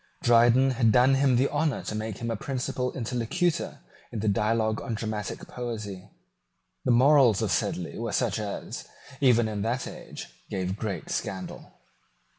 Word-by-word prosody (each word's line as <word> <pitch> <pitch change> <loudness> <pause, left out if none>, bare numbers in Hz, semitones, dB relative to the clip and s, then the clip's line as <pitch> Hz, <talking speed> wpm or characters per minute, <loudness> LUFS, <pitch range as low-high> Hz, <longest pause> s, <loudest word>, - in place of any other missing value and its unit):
Dryden 120 +3 +5
had 115 -3 +3
done 125 +4 +5
him 135 -1 +3
the 130 +3 +3
honour 150 -1 0
to - - -4
make 110 -1 -4
him 115 0 -3
a - - -1
principal 125 +1 -2
interlocutor 125 +8 -1 0.3
in 115 - -4
the 110 - -1
Dialogue 110 +2 +1
on 115 - -3
Dramatic 110 -2 -4
Poesy. 105 -6 -6 0.7
The - - -1
morals 130 -3 +5
of - - 0
Sedley 90 +3 -1
were 115 -1 -3
such 115 -1 0
as, 105 -2 -5 0.3
even 120 -4 +4
in 105 -2 -3
that 120 +5 -1
age, - - -8 0.2
gave 95 0 -2
great 100 -6 -4
scandal. 95 -1 -4
115 Hz, 155 wpm, -27 LUFS, 105-125 Hz, 0.7 s, Dryden